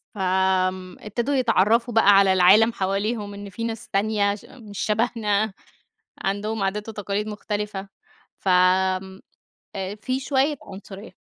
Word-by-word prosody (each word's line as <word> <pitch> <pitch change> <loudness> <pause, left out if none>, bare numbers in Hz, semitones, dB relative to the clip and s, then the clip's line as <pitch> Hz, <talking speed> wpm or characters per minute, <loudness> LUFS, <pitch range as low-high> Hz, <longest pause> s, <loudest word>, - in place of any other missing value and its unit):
فآمم، 185 -1 0
ابتدوا 235 +7 -2
يتعرفوا 235 -1 +2
بقى 225 -3 +5
على 195 -1 +5
العالم 200 +5 +6
حواليهم، 205 +2 -2
إن 200 0 -8
فيه 230 +4 -5
ناس 225 -1 -6
تانية 200 0 +1
ش 205 - -14
مش 215 -6 -10
شبهنا، 215 -2 0 0.7
عندهم 205 +2 -2
عادات 210 +3 -2
وتقاليد 210 -1 -3
مختلفة، 210 -1 -4 0.5
ف - - -10
آآ 185 +1 +1 0.6
في 255 +1 -1
شوية 275 +2 +1
عنصرية. 200 +1 -10
205 Hz, 125 wpm, -23 LUFS, 190-225 Hz, 0.7 s, العالم